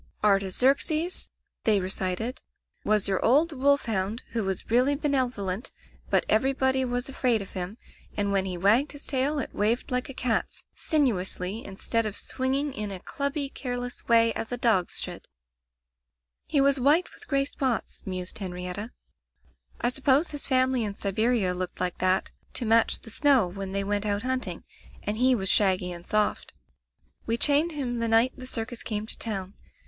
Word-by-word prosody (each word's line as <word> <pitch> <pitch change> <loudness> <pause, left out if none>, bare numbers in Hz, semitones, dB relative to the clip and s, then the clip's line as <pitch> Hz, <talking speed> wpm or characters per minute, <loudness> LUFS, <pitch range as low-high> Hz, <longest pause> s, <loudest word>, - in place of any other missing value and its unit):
'* - - -34
"Artaxerxes," 260 - +2 0.3
they 215 -2 +3
recited, 190 +5 -3 0.4
"was 210 -2 +2
your 195 -1 0
old 300 +8 +4
wolf 280 0 +2
hound 215 +1 -2
who 225 -2 -1
was 190 +2 -4
really 255 +4 +4
benevolent, 255 -7 -1 0.4
but - - +3
everybody 265 +3 +2
was 245 0 -2
afraid 255 -4 +1
of 200 - -7
him, 185 +3 -5 0.4
and 200 -1 0
when 195 -1 +2
he 185 -2 -3
wagged 220 +11 +3
his 285 - -9
tail 280 +2 +2
it 280 - -4
waved 225 +5 0
like 250 +1 -1
a 270 - -7
cat's, 240 -4 -1
sin 310 -3 +2
uously, 190 -1 -1
instead 220 +3 -1
of 205 - -4
swinging 270 +2 -1
in 210 -2 -4
a 195 -2 -5
clubby, 280 - -2
care 250 -2 -4
less 245 0 -7
way, 230 -1 +5
as 225 - -4
a 245 - -2
dog's 220 -8 +2
should/' - - -6 1.2
"He 290 - +1
was 275 0 +4
white 300 +8 +3
with 430 - -13
gray 275 -1 +1
spots," 260 -4 -2
mused 185 +2 -4
Henrietta; 180 +3 -4 0.9
"I 240 - +2
suppose 275 +5 +2
his 290 -2 -4
family 255 -2 +2
in 205 -2 -3
Siberia 210 -1 +1
looked 180 0 -5
like 180 -1 -1
that 185 +1 +1 0.2
to 245 - -1
match 225 +1 +3
the 225 - -9
snow 270 -6 +4
when 190 +1 -6
they 200 0 0
went 205 +1 -1
out 205 +1 -1
hunting, 255 -9 -2 0.4
and 210 +1 -2
he 255 +2 +4
was 195 -4 -2
shaggy 185 -3 +3
and 175 0 -8
soft 215 0 0 0.7
"We 230 +1 +1
chained 295 +6 +3
him 250 -5 -3
the 230 - 0
night 225 +3 +4
the 255 -1 -9
circus 230 -1 -4
came 215 -1 -3
to - - -5
town. 195 -4 -3
230 Hz, 175 wpm, -27 LUFS, 195-265 Hz, 1.2 s, way